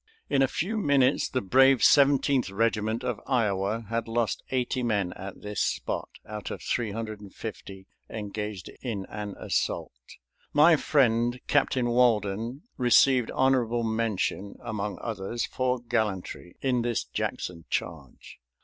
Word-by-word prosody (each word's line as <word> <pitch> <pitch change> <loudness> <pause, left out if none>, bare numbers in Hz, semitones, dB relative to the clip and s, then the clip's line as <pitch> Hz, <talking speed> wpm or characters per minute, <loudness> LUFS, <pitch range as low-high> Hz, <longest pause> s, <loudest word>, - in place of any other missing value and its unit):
In 135 - +3
a 135 - +5
few 195 - -2
minutes 140 -6 +3
the 130 - -1
brave 130 +6 +5
Seventeenth 140 -3 +4
Regiment 110 +2 0
of 125 -4 -2
Iowa 110 -3 0
had 115 0 -1
lost 115 0 -1
80 130 0 -1
men 105 -7 0
at 95 0 -9
this 105 -1 -3
spot, - - -2 0.2
out 105 -2 -6
of - - -6
350 105 -3 -5 0.2
engaged 105 -3 -5
in 105 -7 -4
an 105 -1 -6
assault. - - -2 0.5
My 160 +3 +7
friend 120 -5 +2
Captain 130 -3 +2
Walden 115 - +1
received 125 0 +4
honorable 120 -3 +2
mention, 110 -3 -1
among 105 -1 -3
others, 115 +1 -3
for 130 0 -1
gallantry 105 -7 -3
in 125 -3 +1
this 120 -1 -1
Jackson 85 -2 -4
charge. - - -5
115 Hz, 125 wpm, -27 LUFS, 105-125 Hz, 0.5 s, My